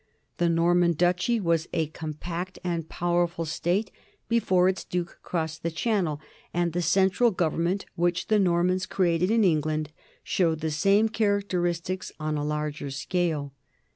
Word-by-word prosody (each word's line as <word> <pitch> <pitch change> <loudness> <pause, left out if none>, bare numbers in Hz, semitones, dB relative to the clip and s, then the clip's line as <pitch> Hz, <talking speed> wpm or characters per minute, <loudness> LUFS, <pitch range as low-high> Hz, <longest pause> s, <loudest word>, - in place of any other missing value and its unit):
The 170 -1 +2
Norman 170 +1 +3
duchy 180 - +1
was 170 -4 0
a 165 -2 +1
compact 165 +4 -6
and 170 -3 -2
powerful 175 -1 0
state 175 +6 -1 0.4
before 190 -6 +3
its 190 0 0
duke 175 -1 -4
crossed 160 -2 -3
the 170 - -1
Channel, 170 -4 0 0.3
and 175 -1 0
the 175 - 0
central 190 +7 +3
government 175 0 0
which 175 0 0
the 215 -1 +3
Normans 180 0 +2
created 180 -1 +1
in 225 0 +3
England 155 -3 +1 0.3
showed 165 -4 +1
the 160 0 -1
same 195 +7 +3
characteristics 185 -5 -1
on 155 0 -2
a 145 - -1
larger 150 -1 -3
scale. 150 0 -2
175 Hz, 140 wpm, -26 LUFS, 160-185 Hz, 0.4 s, Norman